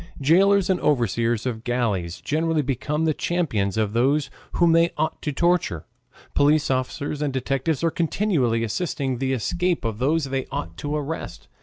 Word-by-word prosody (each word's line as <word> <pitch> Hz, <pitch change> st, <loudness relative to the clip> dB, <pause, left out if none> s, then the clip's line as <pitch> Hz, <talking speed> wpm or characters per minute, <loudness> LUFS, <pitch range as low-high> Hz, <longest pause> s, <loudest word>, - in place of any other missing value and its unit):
Jailers 190 Hz, +7 st, +4 dB
and 190 Hz, -2 st, +1 dB
overseers 120 Hz, -3 st, +1 dB
of 115 Hz, -3 st, -3 dB
galleys 105 Hz, -9 st, -1 dB
generally 160 Hz, 0 st, 0 dB
become 150 Hz, +4 st, -1 dB
the 155 Hz, -, +2 dB
champions 125 Hz, -, -1 dB
of 105 Hz, -2 st, 0 dB
those 135 Hz, +4 st, +2 dB, 0.2 s
whom 170 Hz, -1 st, +4 dB
they 165 Hz, +1 st, +4 dB
ought 155 Hz, +1 st, -1 dB
to 150 Hz, -, -2 dB
torture. 170 Hz, -, +1 dB, 0.5 s
Police 150 Hz, 0 st, +3 dB
officers 140 Hz, +3 st, -2 dB
and 145 Hz, -2 st, 0 dB
detectives 135 Hz, +3 st, -1 dB
are 165 Hz, -, +2 dB
continually 155 Hz, -, +1 dB
assisting 130 Hz, -, -2 dB
the 135 Hz, 0 st, 0 dB
escape 175 Hz, -, -1 dB
of 110 Hz, -1 st, -3 dB
those 150 Hz, +5 st, +2 dB
they 135 Hz, -1 st, -2 dB
ought 85 Hz, 0 st, -4 dB
to 145 Hz, +1 st, -3 dB
arrest. 150 Hz, +2 st, -5 dB
140 Hz, 160 wpm, -23 LUFS, 120-165 Hz, 0.5 s, Jailers